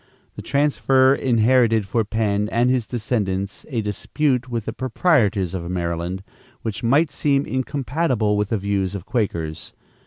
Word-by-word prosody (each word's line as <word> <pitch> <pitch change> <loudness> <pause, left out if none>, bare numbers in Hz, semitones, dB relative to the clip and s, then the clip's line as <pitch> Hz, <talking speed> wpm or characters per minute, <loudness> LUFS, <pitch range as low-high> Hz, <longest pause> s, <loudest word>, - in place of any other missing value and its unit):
The - - -7
transfer 135 -2 +3
inherited 115 -4 +3
for 115 +3 +1
Penn 105 -1 -1
and 120 +2 +2
his 125 -4 0
descendants 100 -5 -2
a 120 -6 -1
dispute 125 +5 -1
with 115 -3 -3
the 115 - -4
proprietors 115 - +1
of 85 -2 -4
Maryland, 85 +1 -3 0.4
which 110 -3 -4
might 140 +7 +3
seem 140 -1 +1
incompatible 130 -4 -1
with 105 -1 0
the 110 - +1
views 100 -1 -1
of 95 -2 -6
Quakers. 85 -10 -3
115 Hz, 145 wpm, -22 LUFS, 100-130 Hz, 0.4 s, transfer